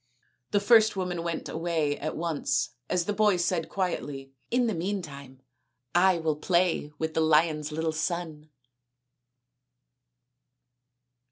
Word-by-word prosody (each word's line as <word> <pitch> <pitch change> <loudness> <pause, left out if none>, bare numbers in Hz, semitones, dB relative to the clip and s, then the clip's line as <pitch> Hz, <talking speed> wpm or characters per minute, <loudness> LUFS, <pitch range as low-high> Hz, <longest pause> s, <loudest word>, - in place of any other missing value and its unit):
The 205 - +2
first 220 +1 +5
woman 180 -2 -2
went 170 -1 -3
away 160 -3 -1
at 155 +2 -4
once 150 -6 -1 0.2
as 175 -2 +1
the 210 - -1
boy 210 -2 +3
said 170 -2 -1
quietly, 140 -8 -3
" - - -44
In 245 +1 +2
the 225 - 0
meantime 150 -8 -5 0.5
I 185 +1 +4
will 160 -2 -1
play 170 -2 +1
with 160 0 -2
the 160 - +1
lion's 155 -1 +2
little 160 +1 -1
son." 155 -2 -3
165 Hz, 125 wpm, -27 LUFS, 150-185 Hz, 0.5 s, first